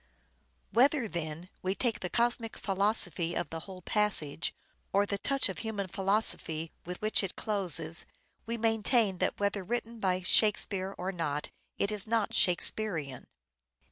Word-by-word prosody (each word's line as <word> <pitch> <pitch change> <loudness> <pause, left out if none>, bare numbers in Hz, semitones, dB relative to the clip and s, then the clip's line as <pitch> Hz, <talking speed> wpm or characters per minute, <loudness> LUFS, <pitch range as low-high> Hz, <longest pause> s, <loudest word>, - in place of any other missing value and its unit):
Whether, 260 0 +3
then, 170 -1 -5
we 190 +1 -1
take 230 -1 0
the 180 - -4
cosmic 235 0 0
philosophy 190 -4 0
of 145 - -3
the 165 - -4
whole 185 -2 -10
passage, 180 -9 +2 0.4
or 200 +1 +3
the 200 0 -3
touch 275 +6 +2
of 190 - -5
human 220 -3 -3
philosophy 190 -5 0 0.2
with 180 0 -5
which 215 - +4
it 195 -3 -4
closes, 175 -6 +1 0.4
we 235 +1 -2
maintain 225 -3 +2
that - - -1
whether 200 -1 0
written 235 +2 -4
by 185 -2 0
" - - -12
Shakespeare 195 -2 +3
" - - -39
or 185 +2 -3
not, 150 -5 -3 0.3
it 200 - 0
is 210 0 -1
not 225 -2 0
Shakespearean. 175 - +1
200 Hz, 155 wpm, -30 LUFS, 175-220 Hz, 0.4 s, which